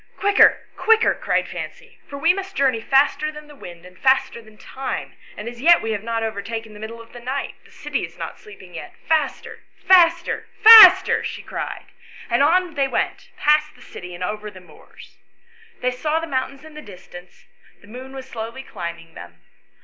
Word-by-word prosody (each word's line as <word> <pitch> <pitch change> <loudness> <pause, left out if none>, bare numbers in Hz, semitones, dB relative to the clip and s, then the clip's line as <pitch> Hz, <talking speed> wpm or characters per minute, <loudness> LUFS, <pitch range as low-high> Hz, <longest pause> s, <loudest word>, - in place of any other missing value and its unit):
" - - -35
Quicker, 405 0 +4
quicker," 450 0 +3
cried - - -2
Fancy, 480 -1 -9
" - - -35
for 280 - -7
we 330 +5 +3
must 385 0 -7
journey 260 -5 +1
faster 290 +4 +1
than 300 0 -12
the 295 - -15
wind 175 -9 -12
and 180 0 -16
faster 265 -3 +1
than 220 -1 -19
time, 265 +3 -6 0.2
and 210 - -7
as 235 0 -9
yet 340 +4 +6
we 225 - -3
have 210 -2 -3
not 230 0 -3
overtaken 220 +1 -6
the 210 - -13
middle 225 +2 -8
of 230 0 -15
the 240 - -10
night; 260 +3 -5
the - - -20
city - - -5
is - - -9
not - - -8
sleeping 190 - -15
yet: 150 - -10
faster 310 -3 -2 0.3
faster 345 -2 +3 0.2
faster!" 380 -4 +9
she - - -6
cried, - - -6 0.5
and 235 - +2
on 345 +3 +2
they 280 -2 0
went - - -3
beyond 300 +1 +3
the - - -20
city 180 0 -10
and 180 - -7
over 210 +3 -5
the 190 -2 -14
moors. 175 -4 -18 0.6
They 250 - 0
saw 300 +5 -2
the 330 - -5
mountains 270 0 -4
in 315 - -13
the 300 - -10
distance; 180 -4 -14 0.4
the - - -19
moon 255 +4 -11
was 265 -1 -9
slowly 230 +2 -7
climbing 170 -6 -8
them. - - -13
260 Hz, 195 wpm, -21 LUFS, 215-310 Hz, 0.6 s, faster